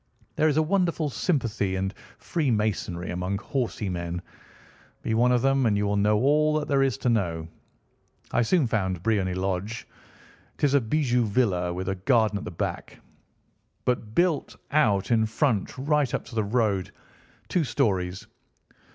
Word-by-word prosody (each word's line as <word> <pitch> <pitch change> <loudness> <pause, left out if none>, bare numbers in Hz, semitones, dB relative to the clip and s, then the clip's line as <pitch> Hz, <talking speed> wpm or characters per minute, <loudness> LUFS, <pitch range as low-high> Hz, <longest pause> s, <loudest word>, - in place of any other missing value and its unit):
There 155 - +3
is 150 -1 +1
a 155 - +4
wonderful 170 -4 0
sympathy 115 - 0
and 95 +1 -2 0.2
freemasonry 110 - -1
among 90 +2 -2
horsey 115 -1 -3
men. 85 -1 -4 0.8
Be 110 - -1
one 120 +3 +3
of 125 -1 +2
them, 135 -2 +3
and 105 -2 +2
you 105 - 0
will 100 0 0
know 105 +1 +3
all 150 +5 +3
that 150 -1 -2
there 140 -2 +2
is 135 -2 +1
to 130 - 0
know. 85 -8 0 0.8
I - - +2
soon 150 +5 +3
found 95 -6 -1
Briony 100 -5 +1
Lodge. 95 +4 -3 0.7
It - - -14
is 140 -2 +4
a 140 - +5
bijou 125 0 +1
villa, 100 -6 +1
with 90 +1 -4
a 95 - +1
garden 105 +2 +2
at - - -8
the - - -4
back, - - -5 0.9
but 115 -3 -1
built 175 -4 +1 0.2
out 110 -9 +2
in 110 -1 +3
front 115 -1 0
right 145 0 +1
up - - -4
to - - -12
the 110 -1 +1
road, 105 -4 0 0.6
two 180 - +1
stories. 95 -8 -1
110 Hz, 165 wpm, -26 LUFS, 95-135 Hz, 0.9 s, a